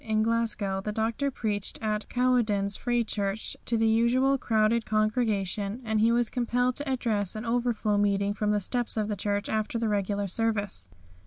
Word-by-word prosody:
In 215 -1 +1
Glasgow 220 -4 0
the 210 - -3
Doctor 225 +6 -1
preached 210 -6 -2
at 215 -1 -1
the - - -6
Cowcaddens 230 -6 +2
Free 240 -1 0
Church 205 -1 0
to 230 - +1
the 225 - +2
usual 245 +5 +3
crowded 225 0 +2
congregation, 215 -1 0
and 220 -1 0
he 225 +2 +4
was 235 -1 +1
compelled 245 0 0
to 285 -1 -2
address 220 -7 0
an 215 +2 -5
overflow 230 -3 0
meeting 200 0 +1
from 210 0 -2
the 210 0 +2
steps 240 +4 -2
of 215 -1 -1
the 210 - -1
church 205 +1 -1
after 220 +1 -1
the 225 -1 -1
regular 200 0 -1
service. 205 - 0
220 Hz, 180 wpm, -27 LUFS, 205-235 Hz, -, he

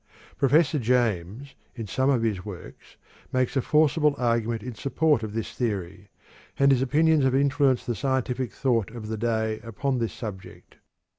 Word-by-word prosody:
Professor 150 +2 +3
James, 120 0 -1 0.2
in 115 -3 -5
some 130 +7 0
of 125 -5 +2
his 105 -5 -1
works, 100 -4 -11 0.3
makes 130 +1 0
a 135 - +2
forcible 150 +1 +2
argument 115 -2 0
in 125 - -6
support 140 +3 +1
of 110 -2 -5
this 115 - -4
theory, 100 -4 -4 0.5
and 140 0 +4
his 130 -2 +3
opinions 150 +3 +3
have 130 0 +2
influenced 140 -2 +2
the 120 - -1
scientific 130 -1 -2
thought 120 -6 0
of 110 -1 -8
the 110 - -3
day 110 -1 -1
upon 125 +4 -2
this 115 -1 -1
subject. 105 -6 -9
125 Hz, 160 wpm, -25 LUFS, 110-140 Hz, 0.5 s, and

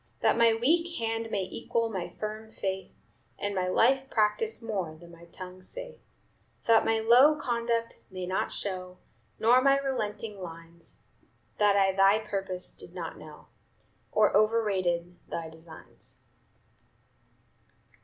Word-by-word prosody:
That - - +4
my 230 -1 +5
weak 335 +8 +1
hand 225 0 -2
may 200 -3 -1
equal 230 +4 -1
my 190 -6 -4
firm 215 +1 -5
faith, 190 -2 -3 0.5
And 205 0 -2
my 185 -1 0
life 265 +8 +3
practice 220 - +1
more 195 -9 -3
than 170 +2 -14
my 170 0 -14
tongue 185 +2 -10
saith; - - -6 0.7
That 225 -1 +5
my 225 - +3
low 245 +7 +6
conduct 235 -4 -1
may 185 -2 -5
not 185 +1 -1
show, 185 -2 -5 0.4
Nor 245 +3 +5
my 275 +1 +5
relenting 220 -6 -3
lines, 165 -1 -9 0.6
That 205 -1 +5
I 195 -1 +4
thy 195 +2 +5
purpose 195 -4 -4
did - - -12
not - - -6
know, - - -13 0.6
Or 215 0 +3
overrated 190 -5 +1
thy 165 -1 -4
designs." 160 0 -11
210 Hz, 135 wpm, -29 LUFS, 185-230 Hz, 0.7 s, low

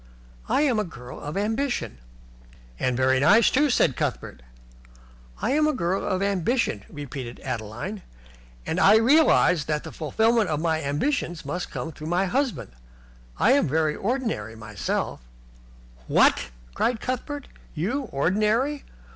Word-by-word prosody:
"I - - +3
am 250 -7 +2
a - - +1
girl 125 -9 -10
of 150 +5 -5
ambition." 220 - -2 0.8
"And 125 -1 0
very 130 0 +3
nice, 210 - +5
too," 290 +2 +3
said 140 - +2
Cuthbert. - - -3 1.0
"I - - +1
am 305 +2 +3
a 305 - +1
girl 185 -3 -1
of 190 0 -1
ambition," 200 - 0
repeated 135 -4 -7
Adeline, 125 - -5 0.6
"and - - -1
I 205 - +7
realize 225 - +4
that 150 -1 -1
the - - -8
fulfilment 220 +6 +1
of 150 -2 -1
my 160 -1 0
ambitions 160 - -2
must 175 +6 -4
come 160 - -5
through 155 0 -9
my 175 +3 +1
husband. 255 - -1 0.7
I 235 - +4
am 280 - +4
very 155 +1 +1
ordinary 220 - -2
myself 110 - -3 0.5
" - - -25
"What!" - - +3 0.2
cried 240 - 0
Cuthbert. 260 +4 -4 0.3
"You 240 - -1
ordinary? 215 - +1
180 Hz, 140 wpm, -25 LUFS, -, 1.0 s, I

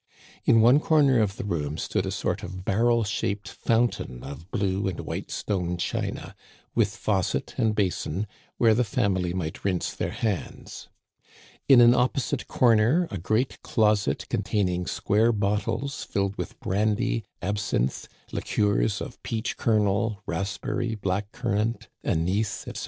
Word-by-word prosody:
In 115 - +6
one 125 +6 +6
comer 145 -5 +4
of 100 -3 +1
the - - -4
room 80 -6 -2
stood - - -1
a - - -2
sort - - -2
of 95 +1 -7
barrel 115 +3 +3
shaped 100 0 -2
fountain 115 - -1
of 70 +5 -9
blue 100 -3 0
and 90 -3 -3
white - - -5
stone 90 -4 -2
china, - - -3 0.4
with - - +1
faucet - - -1
and 110 -2 +1
basin, 95 -1 -1 0.3
where 115 -2 +5
the 120 +3 +3
family 100 -7 0
might 85 -3 -4
rinse 95 -3 -1
their - - -2
hands. 105 -7 -4 0.8
In 130 -3 +9
an 120 0 +8
opposite 130 +1 0
comer 120 +8 +3
a 100 - -3
great 110 +9 0
closet, 105 -2 +1
containing 90 -4 0
square 110 +3 +2
bottles 105 +6 -1
filled 100 0 -1
with - - -6
brandy, 110 +4 0 0.2
absinthe, 100 - -1 0.2
liqueurs 100 - 0
of - - -7
peach 110 -1 -3
kernel, 105 -1 +1
raspberry, 95 +5 -2
black 100 0 -2
currant, 115 -2 -1
anise, 95 +6 0
etc. - - -5
105 Hz, 140 wpm, -26 LUFS, 95-115 Hz, 0.8 s, In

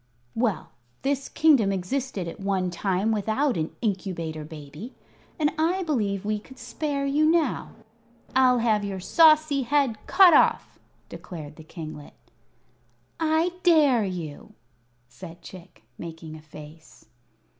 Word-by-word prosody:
"Well, 225 -8 -1 0.3
this 275 0 -1
kingdom 285 -11 +4
existed 195 +1 -3
at 165 - -8
one 195 -2 -1
time 190 +4 0
without 220 +6 0
an 160 -2 -3
Incubator 180 -7 -3
Baby, 150 - -10 0.4
and 300 -2 +1
I 355 +4 +1
believe 205 - -1
we 210 0 -1
could 260 +5 -16
spare 280 +3 -3
you 285 +2 +1
now. 325 -4 0 0.6
I'll 255 -1 +5
have 220 -3 +1
your 195 -2 -4
saucy 310 - +4
head 260 -3 +1
cut 370 -3 +7
off," - - +3 0.3
declared 155 -5 -9
the 160 - -12
kinglet. 155 -2 -9 1.0
"I 320 +2 +1
dare 300 - +4
you!" 175 -6 -6 0.5
said 165 +7 -12
Chick, 175 - -13 0.2
making 165 -2 -8
a 155 - -11
face. 155 +1 -14
210 Hz, 125 wpm, -25 LUFS, 170-280 Hz, 1.0 s, cut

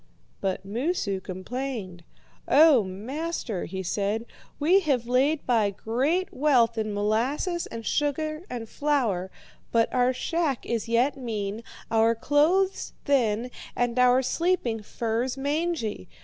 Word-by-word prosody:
"But 195 0 -2
Moosu 220 - -1
complained. 185 -1 -5 0.4
'O 295 -6 +6
master,' 230 - -4
he 190 +2 -5
said, 205 +5 -1 0.3
'we 340 +7 +5
have 275 -10 0
laid 270 +5 +2
by 225 -5 +3
great 270 - -1
wealth 250 -5 +3
in 215 -1 -2
molasses 240 - 0
and 230 -1 -7
sugar 305 +3 -1
and 235 -2 -5
flour, 235 -11 0 0.4
but 230 -1 +2
our 250 0 +3
shack 295 +1 -1
is 230 -1 -2
yet 245 +5 +2
mean, 220 -3 -4 0.3
our 225 +1 +4
clothes 320 - +2
thin, 245 -3 +1 0.2
and 245 0 0
our 250 +1 +5
sleeping 260 -7 0
furs 235 +4 -2
mangy. 285 - -2
245 Hz, 120 wpm, -26 LUFS, 220-290 Hz, 0.4 s, O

